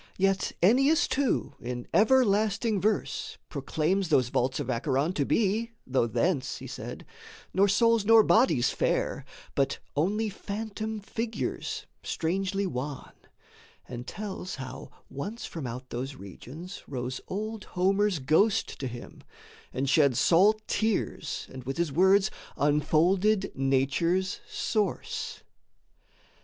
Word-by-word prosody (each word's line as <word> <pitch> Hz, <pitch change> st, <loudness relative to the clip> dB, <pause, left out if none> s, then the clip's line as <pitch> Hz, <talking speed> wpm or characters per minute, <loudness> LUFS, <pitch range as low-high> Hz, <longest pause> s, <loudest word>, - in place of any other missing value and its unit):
Yet 195 Hz, 0 st, +1 dB
Ennius 270 Hz, -, +5 dB
too 275 Hz, -2 st, 0 dB
in 120 Hz, 0 st, -5 dB
everlasting 215 Hz, -2 st, +3 dB
verse 215 Hz, -1 st, -1 dB
Proclaims 160 Hz, +5 st, -1 dB
those 130 Hz, -6 st, +3 dB
vaults 130 Hz, +3 st, 0 dB
of 145 Hz, -, -3 dB
Acheron 135 Hz, +6 st, 0 dB
to 145 Hz, -6 st, 0 dB
be, 225 Hz, -, +1 dB
Though 130 Hz, -2 st, +1 dB
thence, 145 Hz, +4 st, 0 dB
he -, -, -9 dB
said, -, -, -7 dB, 0.5 s
nor 195 Hz, +2 st, +4 dB
souls 230 Hz, +2 st, +3 dB
nor 225 Hz, +1 st, +7 dB
bodies 215 Hz, -, +4 dB
fare, -, -, -1 dB, 0.3 s
But 135 Hz, -, +1 dB, 0.2 s
only 205 Hz, +9 st, +1 dB
phantom 215 Hz, +1 st, -5 dB
figures, 225 Hz, +2 st, -3 dB, 0.2 s
strangely 195 Hz, +4 st, -1 dB
wan, 140 Hz, -4 st, -5 dB, 0.8 s
And 120 Hz, 0 st, -7 dB
tells 200 Hz, -3 st, -5 dB
how 130 Hz, -1 st, -8 dB, 0.2 s
once 200 Hz, -, -6 dB
from 155 Hz, -6 st, -5 dB
out 125 Hz, +2 st, -7 dB
those 130 Hz, +3 st, -4 dB
regions 145 Hz, -, -9 dB
rose 125 Hz, -1 st, -4 dB
Old 215 Hz, +2 st, -4 dB
Homer's 195 Hz, +1 st, +1 dB
ghost 155 Hz, +10 st, +2 dB
to 135 Hz, -, -2 dB
him 120 Hz, -1 st, -9 dB, 0.5 s
and 135 Hz, +2 st, -2 dB
shed 140 Hz, -4 st, +4 dB
salt 210 Hz, +6 st, +4 dB
tears 220 Hz, -2 st, -1 dB
And 130 Hz, -1 st, -8 dB
with 135 Hz, +2 st, -4 dB
his 170 Hz, -3 st, 0 dB
words 190 Hz, +6 st, +4 dB, 0.3 s
unfolded 175 Hz, +8 st, +2 dB
Nature's 140 Hz, +8 st, +1 dB
source. 215 Hz, -3 st, -2 dB
185 Hz, 120 wpm, -28 LUFS, 135-210 Hz, 0.8 s, nor